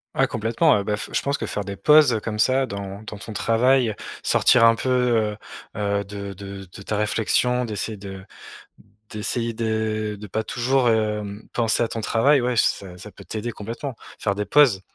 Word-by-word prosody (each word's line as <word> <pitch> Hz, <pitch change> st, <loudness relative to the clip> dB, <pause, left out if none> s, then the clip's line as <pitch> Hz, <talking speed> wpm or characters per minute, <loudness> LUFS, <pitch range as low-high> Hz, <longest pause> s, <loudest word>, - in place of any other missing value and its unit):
Ah, -, -, +3 dB
complètement. 115 Hz, +7 st, +2 dB
Heu 100 Hz, -, -2 dB
bah, 105 Hz, +1 st, -1 dB
f 105 Hz, -, -6 dB
je -, -, 0 dB
pense 140 Hz, +1 st, -1 dB
que -, -, -3 dB
faire 105 Hz, -, -3 dB
des 100 Hz, 0 st, -5 dB
pauses, 150 Hz, +6 st, +5 dB
heu, 110 Hz, -, 0 dB
comme 105 Hz, 0 st, -5 dB
ça 130 Hz, +4 st, +2 dB
dans 100 Hz, -1 st, -6 dB
dans 110 Hz, -1 st, -8 dB
ton 110 Hz, +2 st, -8 dB
travail, 115 Hz, +2 st, +2 dB, 0.3 s
sortir 125 Hz, -3 st, +4 dB
un 115 Hz, 0 st, +6 dB
peu, 130 Hz, -, -3 dB
heu 120 Hz, -4 st, +1 dB, 0.4 s
heu, 100 Hz, -1 st, -1 dB
de 100 Hz, 0 st, -7 dB
de 100 Hz, 0 st, -9 dB
de 95 Hz, -, -11 dB
ta 105 Hz, -, -2 dB
réflexion, 120 Hz, +4 st, +1 dB
d'essayer 110 Hz, 0 st, -4 dB
de 95 Hz, -1 st, -9 dB, 0.9 s
d'essayer 115 Hz, +2 st, -2 dB
de 110 Hz, -1 st, -2 dB
de 105 Hz, -, -7 dB
pas 110 Hz, +3 st, -2 dB
toujours, 125 Hz, +2 st, +1 dB
hem, 105 Hz, -1 st, -2 dB
penser 115 Hz, -1 st, +1 dB
à -, -, -3 dB
ton 115 Hz, -, -4 dB
travail, 135 Hz, +6 st, +3 dB
ouais, 125 Hz, 0 st, -1 dB
ç -, -, +5 dB
ça 90 Hz, -2 st, -2 dB
ça 105 Hz, +3 st, -11 dB
peut -, -, -14 dB
t'aider 115 Hz, +2 st, -4 dB
complètement. 115 Hz, +6 st, -6 dB, 0.2 s
Faire 100 Hz, -, 0 dB
des 105 Hz, +1 st, -3 dB
pauses, 135 Hz, -10 st, +5 dB
110 Hz, 200 wpm, -23 LUFS, 100-120 Hz, 0.9 s, un